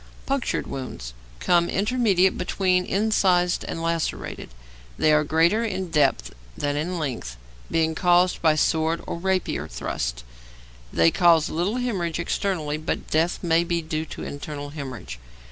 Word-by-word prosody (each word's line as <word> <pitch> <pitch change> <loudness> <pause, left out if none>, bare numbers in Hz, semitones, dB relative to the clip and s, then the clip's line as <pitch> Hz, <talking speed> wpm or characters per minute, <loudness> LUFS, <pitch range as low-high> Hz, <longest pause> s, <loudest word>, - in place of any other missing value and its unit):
Punctured 275 -2 -1
wounds 125 - -6 0.3
come 175 -1 +3
intermediate 200 -3 +2
between 180 0 +1
incised 190 -4 +2
and 165 - -4
lacerated. 165 -1 -2 0.5
They 155 - +4
are 150 0 +4
greater 165 +9 +2
in 190 -5 -3
depth 145 -4 +2 0.2
than 145 0 -1
in 170 +5 -2
length, 125 - -4 0.3
being 160 -1 +1
caused 180 +2 +3
by 160 -2 +4
sword 160 +2 +1
or 170 - -4
rapier 185 - -1
thrusts. - - -4 0.7
They 80 0 +4
cause 170 -2 +4
little 175 +7 -1
hæmorrhage 195 -10 -1
externally, 170 -3 -1
but 155 +2 -4
death 165 +3 +1
may 170 0 +3
be 170 -1 -1
due 155 0 -3
to - - -8
internal 145 0 -6
hæmorrhage. 130 - -7
165 Hz, 140 wpm, -24 LUFS, 150-185 Hz, 0.7 s, They